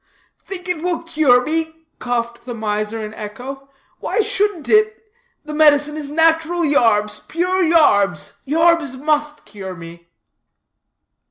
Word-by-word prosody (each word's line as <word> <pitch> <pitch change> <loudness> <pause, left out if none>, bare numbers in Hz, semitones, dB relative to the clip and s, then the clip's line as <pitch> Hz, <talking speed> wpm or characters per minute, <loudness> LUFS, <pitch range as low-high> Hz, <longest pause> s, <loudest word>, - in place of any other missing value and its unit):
"Think 370 -1 -6
it 360 -3 0
will 350 -1 -2
cure 275 -7 +3
me?" 320 +1 -3
coughed 235 -1 -3
the 245 -2 -6
miser 215 0 -3
in 215 - -9
echo; 260 +7 -8 0.3
"why - - 0
shouldn't 415 -6 0
it? 430 0 +3 0.5
The 305 - -7
medicine 300 -1 +4
is 300 -2 -6
nat'ral 325 +2 +2
yarbs, 215 -7 +2
pure 365 +3 0
yarbs; 205 - +2
yarbs 325 -3 +2
must 300 0 -1
cure 195 -3 -8
me." 170 0 -12
295 Hz, 125 wpm, -19 LUFS, 225-330 Hz, 0.5 s, medicine